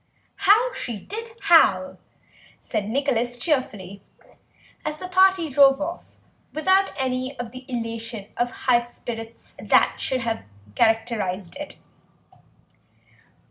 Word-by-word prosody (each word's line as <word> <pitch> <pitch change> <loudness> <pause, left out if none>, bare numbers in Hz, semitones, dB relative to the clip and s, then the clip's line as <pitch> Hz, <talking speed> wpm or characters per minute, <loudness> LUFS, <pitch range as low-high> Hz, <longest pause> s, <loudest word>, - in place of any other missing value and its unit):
"How 460 +5 +5
she 235 - -4
did 450 - -7
howl," 190 - +4 0.6
said 215 -3 -3
Nicholas 245 -1 0
cheerfully, 210 - -2 0.8
as 305 -1 -3
the 365 - -6
party 375 -2 +4
drove 275 -1 +5
off 335 +4 -6 0.4
without 375 +5 +3
any 260 0 -2
of 245 -2 -6
the 255 +1 -11
elation 230 -2 -3
of 240 0 0 0.2
high 245 -2 +5
spirits 230 -1 -9
that - - +3
should 260 -1 0
have 230 -1 -2 0.3
characterised 220 - 0
it. 295 0 -7
250 Hz, 110 wpm, -23 LUFS, 225-305 Hz, 0.8 s, How